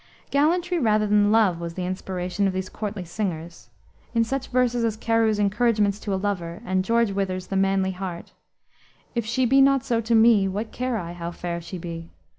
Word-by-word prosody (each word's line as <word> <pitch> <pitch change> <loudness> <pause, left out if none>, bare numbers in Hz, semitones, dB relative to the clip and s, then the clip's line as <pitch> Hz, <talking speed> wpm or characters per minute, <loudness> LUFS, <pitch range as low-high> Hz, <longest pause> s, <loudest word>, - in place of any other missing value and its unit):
Gallantry 345 +5 +2
rather 215 -5 +2
than 205 0 +3
love 210 -6 +3
was 170 -1 -6
the 185 - -3
inspiration 185 +1 -2
of 190 - -1
these 185 0 -3
courtly 210 -3 -5
singers. 170 -3 -5 0.5
In 230 - +4
such 265 +3 -3
verses 245 -1 +1
as 220 -2 0
Carew's 225 -1 +2
Encouragements 210 0 +1
to 205 - -5
a - - +1
Lover, 185 -4 -3
and 185 0 0
George 230 +1 +2
Wither's 190 -2 -2
The 195 - -5
Manly 195 0 +2
Heart 185 -2 -6 0.8
"If 235 -2 -2
she 255 +3 +1
be 270 +3 +5
not 275 -1 +4
so 235 -3 +1
to 230 +1 +1
me, 220 -3 +5
What 205 +4 -4
care 255 -1 -2
I 170 -4 -5
how 170 -1 -5
fair 170 0 -5
she 175 +2 -7
be?" 165 -1 -7
205 Hz, 195 wpm, -24 LUFS, 185-230 Hz, 0.8 s, be